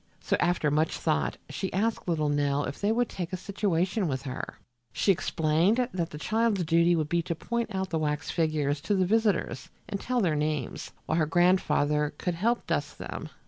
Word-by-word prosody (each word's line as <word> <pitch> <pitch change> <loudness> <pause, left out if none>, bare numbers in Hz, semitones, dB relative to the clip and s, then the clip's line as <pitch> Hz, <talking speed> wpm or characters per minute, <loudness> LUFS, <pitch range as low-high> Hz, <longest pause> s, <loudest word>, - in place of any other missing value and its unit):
So, - - 0
after 175 -4 +2
much 155 +2 +1
thought, 155 -2 0
she 150 +6 -4
asked 220 +2 -1
little 155 -3 +1
Nell 145 0 +1
if 140 - -5
they 205 +1 +2
would 240 +1 +2
take 175 -3 -5
a 185 - -2
situation 190 0 0
with 135 -2 -2
her. 130 -2 -6 0.3
She 200 - +3
explained 180 +8 +2
that 170 -3 -1
the 150 - -8
child's 215 +3 +1
duty 170 +1 +4
would 155 -2 0
be 170 +2 +1
to 170 0 -3
point 235 +7 -2
out 190 0 -2
the 160 - 0
wax 150 -1 -1
figures 150 -3 0
to 205 - 0
the 190 -1 +3
visitors 215 -1 +1 0.2
and 205 -3 -3
tell 250 0 0
their 175 -8 +2
names, 150 -4 -2
while 160 +5 +1
her 155 - +2
grandfather 150 -4 +2
could 180 - -1
help 230 +8 0
dust - - -2
them. - - -6
170 Hz, 195 wpm, -28 LUFS, 150-195 Hz, 0.3 s, duty